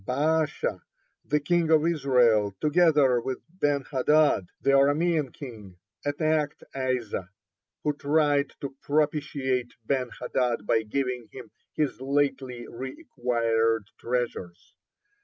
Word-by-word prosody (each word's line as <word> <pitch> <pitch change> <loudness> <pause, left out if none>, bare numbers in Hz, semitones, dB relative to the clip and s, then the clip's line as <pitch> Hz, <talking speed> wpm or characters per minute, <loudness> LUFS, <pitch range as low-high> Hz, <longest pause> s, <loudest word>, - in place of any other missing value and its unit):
Baasha, 145 - 0 0.4
the 150 - +1
king 165 +2 +1
of 160 -1 +4
Israel, 125 - +3
together 150 -6 +4
with 130 +1 -3
Ben 145 -6 0
hadad, 145 - +2
the 140 - +2
Aramean 145 +1 +3
king, 110 -9 -10 0.3
attacked 150 0 0
Asa, 125 -8 -2 0.5
who 150 - +1
tried 145 -1 +2
to 140 -1 -5
propitiate 140 -4 0
Ben 130 -1 0
hadad 120 -5 -1
by 110 +1 +2
giving 125 +1 -3
him 125 -5 -11 0.2
his 150 -4 -1
lately 135 -3 -1
re 130 - -7
acquired 115 - 0
treasures. 105 -8 -4
135 Hz, 110 wpm, -27 LUFS, 120-150 Hz, 0.5 s, of